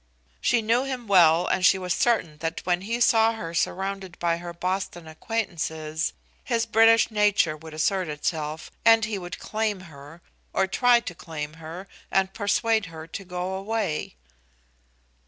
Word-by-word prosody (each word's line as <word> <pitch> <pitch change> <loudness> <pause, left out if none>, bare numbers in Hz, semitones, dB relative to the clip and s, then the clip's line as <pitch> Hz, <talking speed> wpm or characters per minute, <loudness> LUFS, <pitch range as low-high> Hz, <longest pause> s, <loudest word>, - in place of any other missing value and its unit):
She 235 -2 +2
knew 230 +4 +2
him 260 -3 -4
well, 175 -4 +5
and 185 - 0
she 190 - +6
was 180 -2 -1
certain 175 -11 +1
that 165 0 -3
when 180 0 +1
he 230 +5 -2
saw 225 -1 +4
her 170 -7 -6
surrounded 190 +1 -2
by 170 -1 0
her 175 0 -7
Boston 180 -1 -3
acquaintances, 160 -4 -3 0.3
his 235 -3 0
British 225 +1 +5
nature 205 -7 +2
would 155 0 -11
assert 185 +3 0
itself, 155 +1 -3
and 225 -1 +6
he 215 -2 -3
would 175 0 -7
claim 215 -3 -2
her, 160 -1 -13 0.3
or 195 - +2
try 240 +4 +4
to 180 - -6
claim 155 -3 -7
her, 170 +5 -8 0.2
and 190 0 +1
persuade 220 0 +1
her 160 -1 -9
to 170 +4 -7
go 180 0 -4
away. 195 - -2
185 Hz, 155 wpm, -25 LUFS, 165-220 Hz, 0.3 s, she